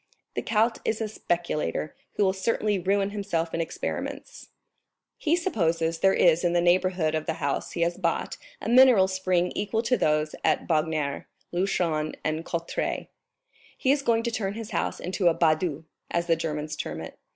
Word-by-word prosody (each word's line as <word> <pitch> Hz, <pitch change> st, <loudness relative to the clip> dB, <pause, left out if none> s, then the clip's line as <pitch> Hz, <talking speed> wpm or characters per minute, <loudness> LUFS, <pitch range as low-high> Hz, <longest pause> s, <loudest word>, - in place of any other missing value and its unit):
"The -, -, -2 dB
count 225 Hz, +1 st, +1 dB
is 220 Hz, -, -1 dB
a 220 Hz, -, -1 dB
speculator, 175 Hz, -6 st, -2 dB, 0.2 s
who 210 Hz, -, +1 dB
will 190 Hz, -1 st, +3 dB
certainly 210 Hz, 0 st, 0 dB
ruin 195 Hz, +2 st, +1 dB
himself 190 Hz, -5 st, -2 dB
in 165 Hz, -, 0 dB
experiments. 165 Hz, -, -5 dB, 0.7 s
He 320 Hz, +1 st, +2 dB
supposes 165 Hz, -, 0 dB
there 195 Hz, -, +5 dB
is 170 Hz, 0 st, +4 dB
in 175 Hz, -1 st, +2 dB
the 175 Hz, -, +3 dB
neighborhood 175 Hz, -2 st, +2 dB
of 155 Hz, -1 st, -2 dB
the 160 Hz, -, -1 dB
house 140 Hz, -2 st, -2 dB
he 170 Hz, -, -3 dB
has 170 Hz, +2 st, 0 dB
bought 170 Hz, -3 st, -1 dB, 0.2 s
a -, -, -6 dB
mineral 240 Hz, -5 st, +7 dB
spring 185 Hz, -1 st, 0 dB
equal 220 Hz, +2 st, -1 dB
to 250 Hz, +1 st, +2 dB
those 155 Hz, 0 st, +1 dB
at 155 Hz, -, +1 dB
Bagnères, 155 Hz, -3 st, 0 dB, 0.3 s
Luchon, 170 Hz, -4 st, 0 dB
and 155 Hz, +1 st, -1 dB
Cauterets. 170 Hz, -1 st, -3 dB, 0.7 s
He 260 Hz, -, +2 dB
is 280 Hz, 0 st, +2 dB
going 230 Hz, -4 st, +2 dB
to 235 Hz, -, -1 dB
turn 205 Hz, -3 st, -2 dB
his 225 Hz, 0 st, -7 dB
house 175 Hz, -, -1 dB
into 180 Hz, +1 st, 0 dB
a 165 Hz, -, +4 dB
Badhaus, 160 Hz, -1 st, +1 dB, 0.3 s
as 170 Hz, 0 st, 0 dB
the 165 Hz, -1 st, +3 dB
Germans 155 Hz, -1 st, -3 dB
term -, -, -5 dB
it. -, -, -9 dB
175 Hz, 175 wpm, -26 LUFS, 160-205 Hz, 0.7 s, mineral